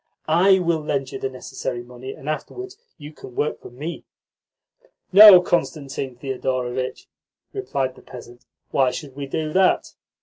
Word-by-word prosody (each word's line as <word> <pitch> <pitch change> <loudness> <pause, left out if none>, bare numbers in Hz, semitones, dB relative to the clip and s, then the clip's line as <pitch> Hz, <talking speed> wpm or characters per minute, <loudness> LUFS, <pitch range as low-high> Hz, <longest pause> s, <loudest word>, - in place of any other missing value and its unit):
I 185 +5 +5
will 170 -3 0
lend 140 -3 -2
you - - -6
the 135 - -2
necessary 130 -1 -6
money, 125 +2 -9
and 135 - -13
afterwards 375 - -5 0.2
you 150 -1 -10
can 125 -4 -12
work 150 - -2
for - - -10
me." 145 +8 -7 1.1
"No, 205 -2 +11
Constantine 140 -7 -2
Thedorovitch," 130 0 -3 0.5
replied 140 - -2
the - - -17
peasant. 120 -1 -12 0.3
"Why 135 -2 +3
should 135 +1 -7
we 140 -1 -5
do 155 +2 -3
that? 190 0 +2
140 Hz, 145 wpm, -22 LUFS, 130-165 Hz, 1.1 s, No